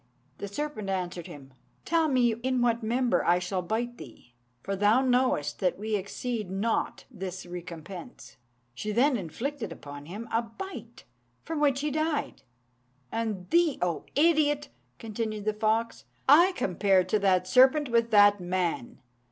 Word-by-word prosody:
The 200 - -4
serpent 215 -2 -4
answered 180 -3 -3
him, 135 -2 -12 0.3
'Tell 330 -1 +2
me 250 -5 +3
in 250 +2 -1
what 235 0 +2
member 240 +2 +1
I 175 - +4
shall 180 +1 -2
bite 235 +6 -3
thee; 120 -1 -13 0.3
for 195 - -2
thou 205 +6 +4
knowest 250 - +1
that 185 - 0
we 215 +2 -2
exceed 210 +1 -4
not 200 +4 -1
this 190 -5 -6
recompense.' 175 +4 -9 0.4
She 170 - -4
then 255 +6 +3
inflicted 225 - -4
upon 145 -2 -9
him 210 +6 -7
a 230 - +2
bite, 240 +13 -9 0.4
from 325 -2 -4
which 280 -2 +2
he 300 0 -1
died. 310 0 -2 0.7
And 215 -5 -3
thee, 340 -3 +3
O 170 -3 -2
idiot!" 295 -2 +3 0.3
continued 215 -1 -4
the 215 - +1
fox, 220 +2 -1 0.2
"I 340 +7 +7
compare 190 - +2
to 200 +4 0
that 185 -2 +2
serpent 260 +6 +5
with 235 -1 +2
that 205 -2 +6
man. 175 -7 -2
220 Hz, 150 wpm, -28 LUFS, 185-255 Hz, 0.7 s, I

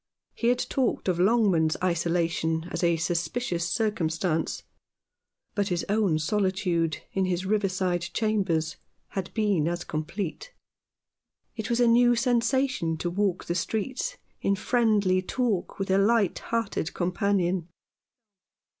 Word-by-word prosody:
He 230 - -1
had 245 +1 +4
talked 260 -6 0
of 180 -2 +1
Longman's 185 -6 +3
isolation 170 -2 0
as 170 - -3
a 170 -1 +3
suspicious 170 +2 -1
circumstance, 170 -5 -1 0.9
but 200 -1 0
his 175 -3 -1
own 205 -6 +2
solitude 180 -2 0
in 190 -1 0
his 185 0 -1
riverside 190 -3 0
chambers 190 -8 0 0.3
had 190 -2 -4
been 205 -8 +2
as 175 +1 -2
complete. 170 - -5 1.0
It 220 -1 -4
was 235 0 +1
a 245 - +5
new 240 +1 +5
sensation 245 -7 +1
to 175 +2 -2
walk 190 -1 0
the 170 - -1
streets 230 - -2 0.2
in 200 - +2
friendly 210 -4 +2
talk 215 -2 -1
with 195 -1 -2
a 190 - +4
light 210 -2 +2
hearted 225 -8 -2
companion. 180 -1 0
190 Hz, 125 wpm, -27 LUFS, 170-220 Hz, 1.0 s, a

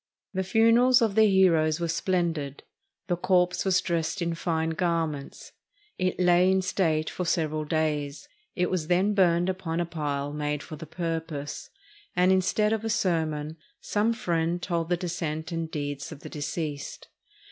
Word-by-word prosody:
The 190 - 0
funerals 230 +5 +5
of 220 -3 +1
their 220 +1 +5
heroes 165 -5 +4
were 170 - -1
splendid. 165 -4 -1 0.4
The 175 - 0
corpse 180 0 +2
was 185 -2 +3
dressed 170 +2 -1
in 170 -1 -1
fine 165 -1 -1
garments. 160 -4 -2 0.5
It 185 0 0
lay 180 0 +5
in 190 0 +2
state 160 -4 0
for 180 - -3
several 155 -3 0
days. 150 - -1 0.3
It 180 -1 0
was 175 -4 -1
then 185 +4 +2
burned 175 -3 +3
upon 185 -3 -2
a 175 - +1
pile 145 -3 -3
made 150 -1 -2
for 155 - -8
the 160 +1 -9
purpose; 160 -3 -4 0.5
and, 180 +1 +4
instead 210 +3 +2
of 220 -1 -2
a 225 - -2
sermon, 160 -6 -1 0.2
some 215 +2 0
friend 170 -6 -1
told 170 -2 -2
the 175 - +2
descent 165 -2 -4
and 165 -1 -3
deeds 145 -1 -4
of 150 -2 -9
the - - -8
deceased. 150 -1 -5
170 Hz, 160 wpm, -27 LUFS, 155-185 Hz, 0.5 s, funerals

